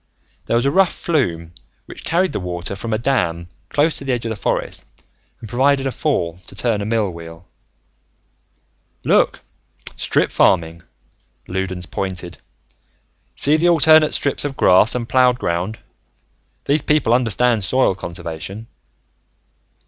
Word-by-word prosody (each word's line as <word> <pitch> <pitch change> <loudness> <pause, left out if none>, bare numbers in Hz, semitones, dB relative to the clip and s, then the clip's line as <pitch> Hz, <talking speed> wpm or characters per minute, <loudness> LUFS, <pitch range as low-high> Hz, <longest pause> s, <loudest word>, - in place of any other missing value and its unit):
There - - +1
was 120 +2 +2
a 140 - +2
rough 190 +1 +3
flume 85 - -2 0.3
which - - -11
carried 180 +3 +1
the - - -3
water 90 +1 -5
from 115 +4 -6
a 110 - +1
dam 85 -9 -1 0.2
close 150 +1 +1
to - - -8
the 135 -1 -1
edge 120 -1 -3
of 115 - -2
the - - -3
forest - - -2 0.6
and 110 - -9
provided 135 +4 +2
a 135 - 0
fall 90 - -1
to - - -11
turn 110 0 0
a 100 - -3
mill 110 -4 0
wheel. 85 0 -11 1.6
"Look, - - +2 0.6
strip - - +1
farming," 85 -2 +2 0.7
Loudons 95 -1 -3
pointed. 90 +1 -5 1.0
"See 150 +2 +3
the 175 +2 +3
alternate 155 -2 +5
strips 140 - -1
of 145 -2 -4
grass 95 +6 +5
and 120 -2 -3
plowed 125 -1 +3
ground. 90 +1 -2 0.9
These 145 +2 +2
people 150 -6 +2
understand 120 -2 +2
soil 130 +3 +2
conservation. 90 +3 -7
115 Hz, 140 wpm, -19 LUFS, 90-135 Hz, 1.6 s, alternate